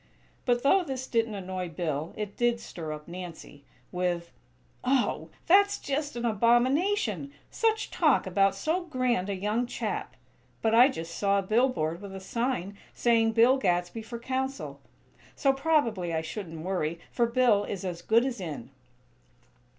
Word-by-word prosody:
But 245 Hz, -1 st, +2 dB
though 375 Hz, +7 st, +5 dB
this 265 Hz, -4 st, -4 dB
didn't 230 Hz, -3 st, 0 dB
annoy 185 Hz, -2 st, -4 dB
Bill, 160 Hz, -1 st, -3 dB
it 210 Hz, -2 st, -4 dB
did 240 Hz, -1 st, +1 dB
stir 160 Hz, -8 st, -7 dB
up 150 Hz, 0 st, -7 dB
Nancy, 170 Hz, -5 st, -9 dB, 0.3 s
with: 175 Hz, -1 st, -2 dB, 0.5 s
"Oh! 260 Hz, 0 st, +1 dB, 0.2 s
That's 400 Hz, +3 st, +5 dB
just 290 Hz, 0 st, -3 dB
an 240 Hz, 0 st, -3 dB
abomination! 235 Hz, -, +2 dB, 0.2 s
Such 445 Hz, -1 st, 0 dB
talk 305 Hz, -6 st, +3 dB
about 195 Hz, +1 st, +2 dB
so 330 Hz, -, -1 dB
grand 250 Hz, -, 0 dB
a 200 Hz, -, -1 dB
young 210 Hz, +5 st, -1 dB
chap! -, -, -4 dB, 0.5 s
But 220 Hz, 0 st, +2 dB
I 240 Hz, +3 st, +8 dB
just 165 Hz, -, -5 dB
saw 200 Hz, +1 st, +2 dB
a 200 Hz, -, 0 dB
billboard 190 Hz, -7 st, +1 dB
with 200 Hz, -1 st, -8 dB
a -, -, -5 dB
sign 200 Hz, -2 st, -2 dB, 0.2 s
saying: 225 Hz, -2 st, +3 dB
'Bill 235 Hz, +4 st, +5 dB
Gadsby 180 Hz, -1 st, 0 dB
for 235 Hz, +2 st, -7 dB
Council;' 265 Hz, +3 st, -3 dB, 0.5 s
so, 275 Hz, -1 st, +3 dB
probably 270 Hz, -, +1 dB
I 160 Hz, -, 0 dB
shouldn't 165 Hz, -2 st, -6 dB
worry, 170 Hz, -3 st, -1 dB
for 235 Hz, -1 st, +2 dB
Bill 235 Hz, -4 st, +3 dB
is 195 Hz, -1 st, -5 dB
as 175 Hz, -2 st, -4 dB
good 230 Hz, +6 st, +3 dB
as 245 Hz, -6 st, -3 dB
in." 150 Hz, -7 st, -6 dB
220 Hz, 155 wpm, -28 LUFS, 180-255 Hz, 0.5 s, I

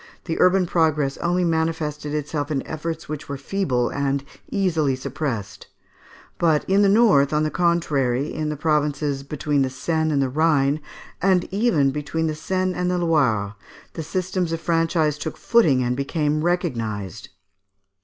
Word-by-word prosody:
the 165 Hz, -, -3 dB
urban 185 Hz, 0 st, +4 dB
progress 155 Hz, -5 st, +1 dB
only 175 Hz, +1 st, 0 dB
manifested 160 Hz, -3 st, -1 dB
itself 150 Hz, 0 st, -3 dB
in 140 Hz, -3 st, -2 dB
efforts 160 Hz, +1 st, -5 dB
which 150 Hz, -1 st, -6 dB
were 140 Hz, -, -3 dB
feeble 135 Hz, -6 st, -1 dB
and 140 Hz, -1 st, -1 dB, 0.3 s
easily 160 Hz, -8 st, +1 dB
suppressed; 130 Hz, -6 st, -5 dB, 0.7 s
but 160 Hz, -3 st, +2 dB
in 195 Hz, +1 st, +3 dB
the 200 Hz, -, +5 dB
north, 195 Hz, -, +4 dB
on 150 Hz, 0 st, +1 dB
the 155 Hz, -, -1 dB
contrary, 150 Hz, -6 st, +1 dB
in 155 Hz, -1 st, -2 dB
the 150 Hz, -, -3 dB
provinces 150 Hz, -2 st, 0 dB
between 145 Hz, 0 st, -1 dB
the 135 Hz, -, +1 dB
Seine 160 Hz, +4 st, -1 dB
and 145 Hz, -, +1 dB
the 135 Hz, -, +2 dB
Rhine, 145 Hz, 0 st, +2 dB, 0.4 s
and 185 Hz, -1 st, +3 dB
even 195 Hz, -, +2 dB
between 150 Hz, +3 st, -2 dB
the 155 Hz, -, 0 dB
Seine 185 Hz, +4 st, -1 dB
and 180 Hz, 0 st, -1 dB
the 180 Hz, -, 0 dB
Loire, 130 Hz, -12 st, +1 dB, 0.4 s
the 165 Hz, -, -5 dB
system 185 Hz, +3 st, -2 dB
of 165 Hz, -1 st, -3 dB
franchise 165 Hz, -3 st, +1 dB
took 160 Hz, -, -5 dB
footing 155 Hz, -, +3 dB
and 125 Hz, 0 st, 0 dB
became 150 Hz, +2 st, -1 dB
recognised. 115 Hz, -, -2 dB
155 Hz, 155 wpm, -23 LUFS, 140-170 Hz, 0.7 s, the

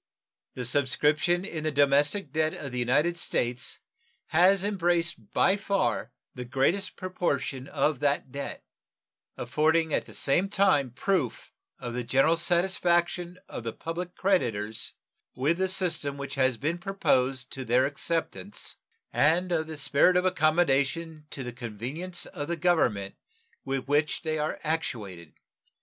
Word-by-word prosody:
The 125 Hz, -, -3 dB
subscription 150 Hz, +7 st, +2 dB
in 160 Hz, -6 st, -5 dB
the 155 Hz, -, 0 dB
domestic 145 Hz, +4 st, +2 dB
debt 155 Hz, 0 st, +1 dB
of 140 Hz, -, -6 dB
the 125 Hz, -, -3 dB
United 145 Hz, +8 st, +2 dB
States 120 Hz, -6 st, -1 dB, 0.5 s
has 185 Hz, +4 st, +4 dB
embraced 175 Hz, -, 0 dB
by 195 Hz, -, +4 dB
far 200 Hz, -1 st, -1 dB, 0.2 s
the 125 Hz, -, -6 dB
greatest 135 Hz, +10 st, 0 dB
proportion 140 Hz, -8 st, -2 dB
of 150 Hz, -2 st, 0 dB
that 140 Hz, -2 st, 0 dB
debt, 140 Hz, +1 st, -6 dB, 0.7 s
affording 155 Hz, +5 st, +1 dB
at -, -, 0 dB
the -, -, -12 dB
same 175 Hz, +8 st, +1 dB
time 195 Hz, -10 st, +3 dB
proof 145 Hz, -, -2 dB, 0.2 s
of 120 Hz, -1 st, -6 dB
the 125 Hz, 0 st, -2 dB
general 135 Hz, +7 st, +3 dB
satisfaction 175 Hz, 0 st, +1 dB
of -, -, -7 dB
the 115 Hz, -1 st, -4 dB
public 175 Hz, +2 st, -5 dB
creditors 115 Hz, -, 0 dB, 0.4 s
with 150 Hz, +7 st, +1 dB
the 190 Hz, 0 st, +1 dB
system 170 Hz, -7 st, 0 dB
which 140 Hz, 0 st, -6 dB
has 130 Hz, -3 st, +2 dB
been 155 Hz, +7 st, -2 dB
proposed 135 Hz, -9 st, 0 dB
to 135 Hz, -, -5 dB
their 125 Hz, +2 st, +3 dB
acceptance 165 Hz, +7 st, -3 dB, 0.4 s
and 175 Hz, +5 st, +3 dB
of 160 Hz, -2 st, 0 dB
the 160 Hz, -1 st, -7 dB
spirit 145 Hz, +5 st, +3 dB
of 180 Hz, -, +1 dB
accommodation 155 Hz, -2 st, +1 dB
to 135 Hz, -, -5 dB
the 125 Hz, 0 st, -6 dB
convenience 125 Hz, -, -5 dB
of 145 Hz, -, -6 dB
the 170 Hz, -, -2 dB
Government 135 Hz, -, +1 dB, 0.5 s
with 135 Hz, -1 st, -3 dB
which 150 Hz, +3 st, +1 dB
they 155 Hz, -1 st, -1 dB
are 150 Hz, +1 st, -2 dB
actuated. 115 Hz, -, -3 dB
155 Hz, 140 wpm, -28 LUFS, 130-175 Hz, 0.7 s, has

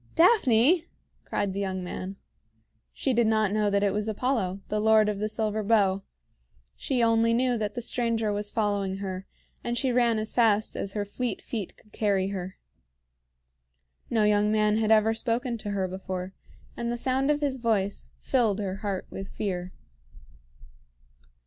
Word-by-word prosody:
"Daphne!" 330 Hz, -, +5 dB, 0.4 s
cried 200 Hz, -2 st, -1 dB
the 200 Hz, -, -3 dB
young 190 Hz, -2 st, -2 dB
man. 185 Hz, +2 st, -5 dB, 0.8 s
She 265 Hz, -, -1 dB
did 235 Hz, -1 st, +3 dB
not 215 Hz, -2 st, +2 dB
know 210 Hz, 0 st, +2 dB
that 200 Hz, 0 st, +1 dB
it 200 Hz, -, +2 dB
was 210 Hz, +1 st, -1 dB
Apollo, 215 Hz, -4 st, -1 dB
the 210 Hz, -, -1 dB
Lord 215 Hz, 0 st, +5 dB
of 210 Hz, -1 st, -1 dB
the 215 Hz, +1 st, -1 dB
Silver 215 Hz, 0 st, -1 dB
Bow; 200 Hz, -3 st, +2 dB, 0.7 s
she 245 Hz, -, 0 dB
only 230 Hz, 0 st, +3 dB
knew 250 Hz, 0 st, +2 dB
that 210 Hz, -1 st, -3 dB
the 240 Hz, -, -3 dB
stranger 230 Hz, -3 st, 0 dB
was 205 Hz, 0 st, -2 dB
following 205 Hz, -3 st, -1 dB
her, 190 Hz, -1 st, -5 dB, 0.4 s
and 240 Hz, 0 st, -2 dB
she 260 Hz, +1 st, +1 dB
ran 240 Hz, -2 st, +3 dB
as 215 Hz, 0 st, -2 dB
fast 215 Hz, -3 st, +2 dB
as 195 Hz, -, -3 dB
her 205 Hz, -1 st, -2 dB
fleet 225 Hz, +1 st, -3 dB
feet 215 Hz, -6 st, -5 dB
could 215 Hz, -, -24 dB
carry 195 Hz, -3 st, +1 dB
her. 190 Hz, -1 st, -5 dB, 1.5 s
No 225 Hz, -2 st, +2 dB
young 210 Hz, 0 st, +3 dB
man 215 Hz, 0 st, +3 dB
had 220 Hz, -1 st, +1 dB
ever 220 Hz, 0 st, +5 dB
spoken 235 Hz, +2 st, -1 dB
to 210 Hz, -, -6 dB
her 195 Hz, -2 st, -1 dB
before, 185 Hz, 0 st, -5 dB, 0.4 s
and 235 Hz, 0 st, -2 dB
the 240 Hz, -, -2 dB
sound 265 Hz, +3 st, 0 dB
of 295 Hz, 0 st, +2 dB
his 280 Hz, -2 st, 0 dB
voice 215 Hz, -5 st, -1 dB
filled 230 Hz, -7 st, +1 dB
her 195 Hz, -2 st, -3 dB
heart 200 Hz, -3 st, -3 dB
with 195 Hz, 0 st, -6 dB
fear. 185 Hz, -4 st, -4 dB
215 Hz, 170 wpm, -27 LUFS, 200-235 Hz, 1.5 s, Daphne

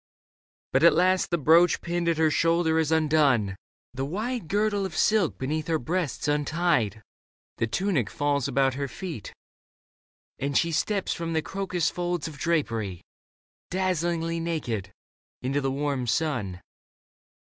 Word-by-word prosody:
But -, -, +4 dB
at -, -, +7 dB
last 185 Hz, +1 st, +3 dB
the 170 Hz, -, +1 dB
brooch 165 Hz, +3 st, +5 dB
Pinned 175 Hz, 0 st, -1 dB
at 165 Hz, -, +1 dB
her 160 Hz, -1 st, +3 dB
shoulder 165 Hz, 0 st, +2 dB
is 160 Hz, -1 st, 0 dB
undone, 145 Hz, -10 st, +3 dB, 0.4 s
the 130 Hz, +1 st, -3 dB
wide 215 Hz, -, -3 dB
Girdle 205 Hz, +1 st, +1 dB
of 190 Hz, -4 st, -4 dB
silk 210 Hz, -7 st, +2 dB
beneath 155 Hz, +4 st, -2 dB
her 165 Hz, -1 st, +2 dB
breasts 155 Hz, 0 st, -2 dB
untied; 145 Hz, -, +1 dB, 0.6 s
The 115 Hz, -, +1 dB
tunic 155 Hz, -, 0 dB
falls 145 Hz, -2 st, 0 dB
about 135 Hz, 0 st, +2 dB
her 140 Hz, +1 st, -3 dB
feet, 160 Hz, -, -7 dB, 1.1 s
and 140 Hz, +1 st, 0 dB
she 170 Hz, -, +2 dB
Leda 165 Hz, -, 0 dB
Steps 205 Hz, -3 st, -1 dB
from 165 Hz, -1 st, -4 dB
the 160 Hz, -1 st, 0 dB
crocus 185 Hz, -4 st, -1 dB
folds 175 Hz, -2 st, -2 dB
of 150 Hz, -3 st, -10 dB
drapery, 115 Hz, -, -1 dB, 0.7 s
Dazzlingly 170 Hz, -2 st, -1 dB
naked, 125 Hz, -, -3 dB, 0.5 s
into 135 Hz, +3 st, 0 dB
the 135 Hz, -, 0 dB
warm 135 Hz, -2 st, -1 dB
sun. 115 Hz, -, -1 dB
160 Hz, 145 wpm, -26 LUFS, 135-175 Hz, 1.1 s, at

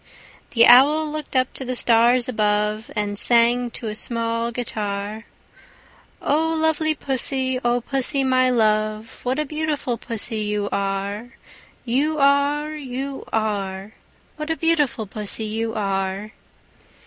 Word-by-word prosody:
The 230 Hz, 0 st, +7 dB
Owl 295 Hz, +6 st, +6 dB
looked 305 Hz, -2 st, -6 dB
up 255 Hz, -1 st, +1 dB
to -, -, -5 dB
the 255 Hz, 0 st, -3 dB
stars 240 Hz, +1 st, +4 dB
above, 210 Hz, -2 st, 0 dB
And 205 Hz, -1 st, -1 dB
sang 240 Hz, +1 st, +3 dB
to 235 Hz, -, -7 dB
a 215 Hz, -, -3 dB
small 230 Hz, +1 st, -2 dB
guitar, 215 Hz, -2 st, -4 dB, 1.0 s
"Oh 320 Hz, +2 st, +1 dB
lovely 315 Hz, 0 st, +1 dB
Pussy, 260 Hz, -2 st, -1 dB
O 240 Hz, 0 st, +1 dB
Pussy, 270 Hz, +2 st, +1 dB
my 255 Hz, -1 st, +3 dB
love, 215 Hz, -1 st, 0 dB
What 255 Hz, +2 st, -1 dB
a 305 Hz, -, 0 dB
beautiful 300 Hz, -5 st, -2 dB
Pussy 225 Hz, -1 st, -3 dB
you 210 Hz, -1 st, -1 dB
are, 200 Hz, +5 st, -3 dB, 0.5 s
You 285 Hz, +6 st, +1 dB
are, 285 Hz, +2 st, +2 dB
You 270 Hz, -1 st, -5 dB
are! 200 Hz, -2 st, -2 dB, 0.5 s
What 305 Hz, 0 st, -5 dB
a 320 Hz, -, -1 dB
beautiful 295 Hz, -9 st, +1 dB
Pussy 210 Hz, +2 st, -2 dB
you 225 Hz, +1 st, -3 dB
are!" 195 Hz, 0 st, -2 dB
240 Hz, 130 wpm, -22 LUFS, 215-275 Hz, 1.0 s, The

